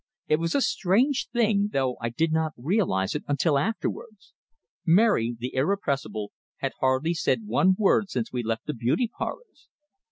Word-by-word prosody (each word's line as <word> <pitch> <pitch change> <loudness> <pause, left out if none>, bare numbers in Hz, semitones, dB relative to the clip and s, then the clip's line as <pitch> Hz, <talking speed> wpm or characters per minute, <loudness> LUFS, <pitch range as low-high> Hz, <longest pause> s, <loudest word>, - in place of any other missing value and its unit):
It 155 - +3
was 165 +1 -2
a 280 - +3
strange 245 +7 +1
thing, 215 -4 +2
though 130 -2 0
I 115 - -1
did 160 +8 0
not 160 -1 0
realize 125 - 0
it 150 - -3
until 145 +1 +2
afterwards. 215 +3 -4 0.5
Mary, 170 - +3
the 125 +2 -5
irrepressible, 135 - -1 0.3
had - - -2
hardly 130 +6 +1
said 210 +6 0
one 190 -2 +3
word 205 -1 +3
since 125 -7 -3
we 125 - -1
left 115 -1 -3
the 150 - -3
beauty 125 - 0
parlors! 485 -3 -7
160 Hz, 160 wpm, -26 LUFS, 130-205 Hz, 0.5 s, It